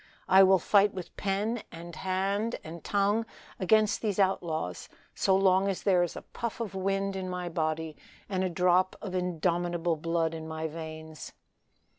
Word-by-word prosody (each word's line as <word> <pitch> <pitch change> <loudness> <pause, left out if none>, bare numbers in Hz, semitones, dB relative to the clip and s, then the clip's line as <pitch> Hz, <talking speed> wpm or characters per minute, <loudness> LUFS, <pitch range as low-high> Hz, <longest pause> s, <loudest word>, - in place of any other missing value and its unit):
I 190 +1 +7
will 190 0 +7
fight 200 +3 +3
with 180 -2 -7
pen 210 +4 -1
and 170 0 -9
hand 195 +5 -1
and 160 +1 -9
tongue 205 +2 +1 0.4
against 215 +2 +3
these 210 -4 -1
outlaws, 170 - -1 0.2
so 190 - +2
long 190 0 +4
as 195 -2 -2
there 185 -3 +4
is 175 - -1
a - - -7
puff 235 -1 -5
of 225 -4 -4
wind 195 +1 -1
in 185 -1 -4
my 180 -1 -3
body, 160 -1 -2 0.3
and 190 -2 -1
a 185 - 0
drop 180 +2 +2
of 195 -3 -6
indomitable 175 -1 0
blood 165 0 0
in 160 -1 -6
my 160 0 -3
veins." 160 -1 -8
185 Hz, 165 wpm, -29 LUFS, 165-195 Hz, 0.4 s, I